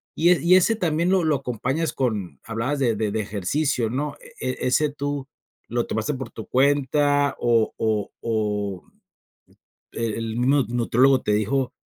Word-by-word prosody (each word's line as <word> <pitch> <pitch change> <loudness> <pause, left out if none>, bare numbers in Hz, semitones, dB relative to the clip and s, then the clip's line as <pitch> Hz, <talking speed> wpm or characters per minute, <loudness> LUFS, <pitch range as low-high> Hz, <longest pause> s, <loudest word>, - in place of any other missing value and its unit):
Y 170 +2 +3
e 180 - +3
y 175 +2 +5
ese 185 +5 +4
también 170 -3 0
lo 190 -2 +3
lo 155 -2 +2
acompañas 130 +5 -2
con 105 - -2
hablabas 120 +6 -2
de 120 -5 +2
de 105 0 -1
de 110 +1 -1
ejercicio, 110 - -1
¿no? 145 +3 -2
¿E - - -6
e 130 - -3
ese 150 +4 +2
tú 145 -1 -4 0.4
lo 120 0 0
tomaste 110 +7 -1
por 130 -3 -7
tu 110 - -9
cuenta, 145 +1 +2
o 115 -2 +2
o 110 -2 -1
o, 105 -4 -2 1.1
eh, 115 -2 -2
el 115 -1 -4
mismo 135 +3 +3
nutriólogo 125 +3 +3
te 105 - 0
dijo, 125 +5 0
125 Hz, 165 wpm, -23 LUFS, 110-145 Hz, 1.1 s, y